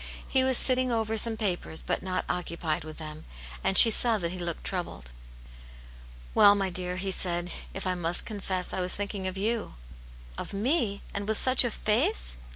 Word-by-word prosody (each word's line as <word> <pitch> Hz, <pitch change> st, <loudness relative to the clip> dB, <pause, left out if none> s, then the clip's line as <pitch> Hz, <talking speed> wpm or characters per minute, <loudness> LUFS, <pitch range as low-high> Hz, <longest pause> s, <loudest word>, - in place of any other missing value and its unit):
He 260 Hz, -1 st, +1 dB
was 260 Hz, -1 st, +2 dB
sitting 255 Hz, -1 st, 0 dB
over 225 Hz, -1 st, -2 dB
some 225 Hz, +1 st, +1 dB
papers, 180 Hz, -6 st, -3 dB
but -, -, -2 dB
not 185 Hz, -1 st, -3 dB
occupied 170 Hz, -3 st, -3 dB
with 155 Hz, 0 st, -10 dB
them, 155 Hz, -1 st, -9 dB, 0.4 s
and 195 Hz, -, +2 dB
she 230 Hz, -, +13 dB
saw 230 Hz, +1 st, +4 dB
that 170 Hz, -4 st, -4 dB
he 185 Hz, -, -8 dB
looked 170 Hz, -2 st, -5 dB
troubled. 175 Hz, -, -6 dB, 0.6 s
" -, -, -20 dB
Well, 205 Hz, 0 st, +6 dB
my 195 Hz, -2 st, -2 dB
dear," 180 Hz, 0 st, -3 dB
he 190 Hz, +1 st, -4 dB
said, 175 Hz, -1 st, -3 dB
" -, -, -18 dB
if 195 Hz, -, -5 dB
I 185 Hz, -, 0 dB
must 175 Hz, -1 st, +2 dB
confess, 190 Hz, -4 st, -5 dB
I 185 Hz, -, -3 dB
was 180 Hz, 0 st, 0 dB
thinking 200 Hz, -1 st, -5 dB
of 185 Hz, 0 st, -6 dB
you.". 220 Hz, -, -3 dB, 0.3 s
" -, -, -20 dB
Of -, -, -7 dB
me! 215 Hz, -1 st, -1 dB
And 200 Hz, 0 st, -5 dB
with 220 Hz, -1 st, -1 dB
such 255 Hz, 0 st, +4 dB
a 245 Hz, -, -1 dB
face 60 Hz, -, -1 dB
185 Hz, 200 wpm, -27 LUFS, 165-215 Hz, 0.6 s, she